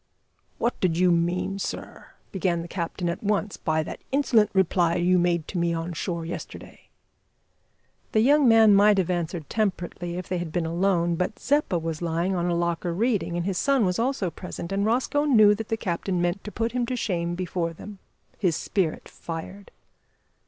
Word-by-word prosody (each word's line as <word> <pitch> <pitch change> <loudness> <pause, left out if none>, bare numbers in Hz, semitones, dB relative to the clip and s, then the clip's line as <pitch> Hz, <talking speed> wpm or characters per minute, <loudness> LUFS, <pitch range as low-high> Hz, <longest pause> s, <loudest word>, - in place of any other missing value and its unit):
"What 240 - -1
did 170 -3 +1
you 180 0 +4
mean, 175 +3 0
sir," - - -6 0.2
began 175 -3 -1
the - - -8
captain 175 0 -3
at 170 - -3
once, 205 0 0
"by 155 -1 0
that - - -8
insolent 255 -6 +3
reply 175 -3 +2
you 180 +1 +3
made 170 -2 +1
to 180 - -3
me 170 0 +1
on 165 +1 -4
shore 170 0 -3
yesterday?" 170 - -9 1.2
The 215 - +3
young 285 +3 +5
man 225 -2 +7
might 205 +1 +5
have 185 -2 +1
answered 170 -3 -3
temperately 180 -5 -2
if 180 - -6
they 180 -1 -2
had 170 -2 -5
been 175 -1 -1
alone, 170 0 +1
but 180 +4 -2
Zeppa 285 -10 +1
was 165 -1 -4
lying 170 +2 0
on 175 0 0
a 175 - +1
locker 170 0 -1
reading, 195 -6 0
and 175 - -2
his 190 -2 -1
son 275 -6 +2
was 180 +2 0
also 230 -7 0
present, 170 +1 -7
and 200 +1 0
Rosco 260 +5 +1
knew 215 -7 +6
that 215 +1 -5
the 225 - 0
captain 180 -1 -2
meant 175 +3 -1
to 210 - -6
put 230 +2 -2
him 245 0 -1
to 255 - -2
shame 175 -7 -2
before 175 -1 -2
them. 200 +4 -11 0.4
His 175 -5 +1
spirit 175 -2 -2
fired. 175 +4 -8
180 Hz, 190 wpm, -25 LUFS, 170-210 Hz, 1.2 s, man